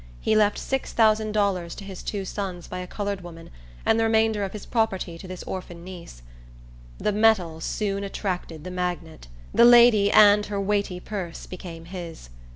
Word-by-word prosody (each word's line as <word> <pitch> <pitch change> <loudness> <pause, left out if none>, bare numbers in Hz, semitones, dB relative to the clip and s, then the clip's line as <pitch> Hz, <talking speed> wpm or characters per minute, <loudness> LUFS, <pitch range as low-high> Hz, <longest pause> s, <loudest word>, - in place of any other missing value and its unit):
He 215 - +1
left 210 -1 +3
six 270 -1 -3
thousand 220 -1 +3
dollars 195 -5 0
to - - -9
his 195 -2 -8
two 200 -2 -4
sons 185 -3 -5
by 180 - -6
a 180 - -6
colored 200 0 -4
woman, 165 -1 -11 0.3
and 225 - +3
the - - +3
remainder 220 -2 +2
of 195 - -3
his 210 - -8
property 195 -7 -1
to 185 - -10
this 185 -1 -7
orphan 175 -2 -7
niece. 175 - -11 0.7
The - - 0
metal 200 -7 +2
soon 200 +2 -2
attracted 180 -5 -4
the 180 - -6
magnet. 175 - -4 0.3
The 235 - +5
lady 235 -4 +7
and 210 0 +7
her 205 -1 -3
weighty 200 -2 -1
purse 180 -4 -6
became 170 -2 -9
his. 170 - -9
195 Hz, 175 wpm, -25 LUFS, 175-210 Hz, 0.7 s, lady